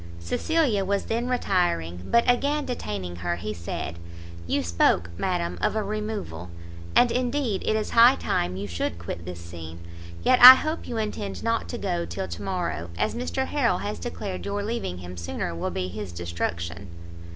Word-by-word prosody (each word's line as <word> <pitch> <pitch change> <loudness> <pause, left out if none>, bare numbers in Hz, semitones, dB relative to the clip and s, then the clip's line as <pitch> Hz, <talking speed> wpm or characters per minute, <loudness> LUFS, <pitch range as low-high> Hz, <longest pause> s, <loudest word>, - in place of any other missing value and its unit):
Cecilia 225 - +1
was 200 +1 0
then 235 +2 -1
retiring; 175 - 0
but 235 0 +3
again 285 +4 +2
detaining 100 - -4
her, 85 0 -1
he 105 +5 -4
said 85 -2 -5 0.5
"You - - +1
spoke, 85 0 +2
madam, 175 - -2
of - - +1
a 215 - 0
removal, 205 - -4 0.5
and 245 -1 +6
indeed 250 -4 0
it 215 - +3
is 215 -1 -2
high 240 +3 +7
time 90 +1 -1
you 100 +2 -4
should 85 -2 -3
quit 85 0 -6
this 90 -1 -6
scene; 85 -1 -9 0.4
yet 255 - +4
I 255 +1 +14
hope 310 +4 -3
you 235 - -4
intend 100 - -3
not - - 0
to - - -4
go 85 -1 -2
till 85 +3 -4
to 85 -1 -7
morrow, 175 - -3
as - - 0
Mr 255 +2 -2
Harrel 245 -10 +1
has 205 +3 -4
declared 200 -6 -5
your 200 0 -2
leaving 210 - -3
him 90 0 -9
sooner 85 0 -3
will 85 - -3
be 90 -1 -3
his 100 0 -6
destruction." 85 +1 -4
105 Hz, 175 wpm, -26 LUFS, -, 0.5 s, I